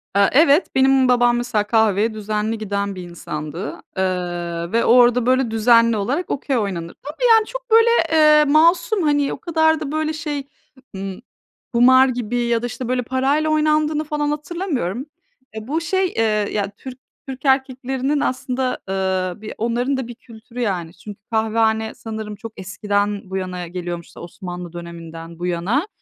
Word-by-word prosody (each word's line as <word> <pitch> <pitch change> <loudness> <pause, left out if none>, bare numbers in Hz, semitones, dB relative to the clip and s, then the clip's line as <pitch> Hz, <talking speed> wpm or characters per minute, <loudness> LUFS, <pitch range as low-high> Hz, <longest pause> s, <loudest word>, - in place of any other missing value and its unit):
Eee, 200 0 +5
evet, 295 +4 +5
benim 265 0 +4
babam 245 -1 +3
mesela 240 -3 0
kahveye 220 -1 +2
düzenli 215 +1 -2
giden 200 -2 -3
bir 185 - -7
insandı. 155 +1 -6 0.2
Eee, 175 -2 -2
ve 230 +1 +2
orada 245 0 +5
böyle 255 -2 +2
düzenli 230 0 +4
olarak 270 - -2
Okey 275 -1 -1
oynanır. 180 -6 -3
Tabii, 305 - -3
yani, 445 -1 +6
çok - - -8
böyle, 455 +1 +6 0.2
ııı, 305 -1 +6
masum, 340 +5 +4
hani, 290 -2 +1
o - - -6
kadar 320 0 +2
da 295 -3 -5
böyle 310 0 -1
şey, 295 -3 -4 0.5
ımm, 195 +1 -6 0.5
kumar 260 +2 +6
gibi 245 -2 -3
ya 235 -1 +1
da - - -3
işte, 245 +1 -5
böyle, 255 0 0
parayla 270 +5 +1
oynandığını 305 0 +2
falan 295 -1 -2
hatırlamıyorum. 295 - -3 0.5
Eee, 220 0 -7
bu 315 +5 -1
şey, 375 +3 0
eee, 225 -10 -1 0.3
ya, 200 -1 -1
Türk 260 -1 -9 0.3
Türk 265 +1 -8
erkeklerinin 265 +1 0
aslında, 255 -1 -2
ııı, 190 0 -1
bir 215 - -7
onların 245 +4 0
da 260 -3 -4
bir 240 - -9
kültürü, 230 +1 -10
yani. 180 -7 -2
Çünkü 205 +1 -11
kahvehane 220 0 +1
sanırım 220 -2 -6
çok 220 +1 -9
eskiden 205 +2 -1
bu 190 - -3
yana 180 -2 -4
geliyormuş 175 -1 -5
Osmanlı 175 0 -8
döneminden 170 -1 -9
bu 175 - -3
yana. 195 - 0
235 Hz, 160 wpm, -20 LUFS, 195-280 Hz, 0.5 s, yani